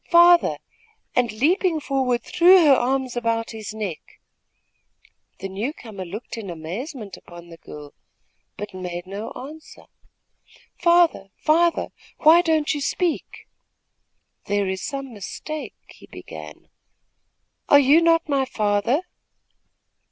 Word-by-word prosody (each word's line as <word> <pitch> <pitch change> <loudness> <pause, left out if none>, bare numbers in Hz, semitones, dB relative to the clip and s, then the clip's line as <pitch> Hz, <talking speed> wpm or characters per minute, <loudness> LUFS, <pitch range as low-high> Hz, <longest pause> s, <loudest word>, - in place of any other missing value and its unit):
father!" 345 0 +6 0.6
and, 245 -2 +2
leaping 320 - +1
forward, 265 -4 -1
threw 360 0 +6
her 285 - +7
arms 260 0 0
about 230 -1 -1
his 220 -2 -7
neck. 210 -7 -7 1.2
The 195 - -5
new 205 +9 -4
comer 210 - -9
looked 210 +6 -7
in 200 -4 -7
amazement 200 - -7
upon 175 0 -14
the 165 - -12
girl, 150 -2 -11 0.6
but 205 -1 -7
made 180 -1 -6
no 200 +4 -6
answer. 305 +4 -11 1.0
"Father, 340 - +3
father, 335 +2 +2 0.3
why 325 +3 +6
don't 315 -3 +1
you 290 - -4
speak?" 345 +3 -2 1.0
"There 205 -1 0
is 190 0 -3
some 275 -3 -5
mistake!" 255 +6 -7
he - - -16
began. 75 -1 -11 1.0
"Are 285 - +8
you 285 +4 +5
not 330 -1 +3
my 275 -2 +1
father?" 215 - 0
250 Hz, 120 wpm, -23 LUFS, 200-310 Hz, 1.2 s, Are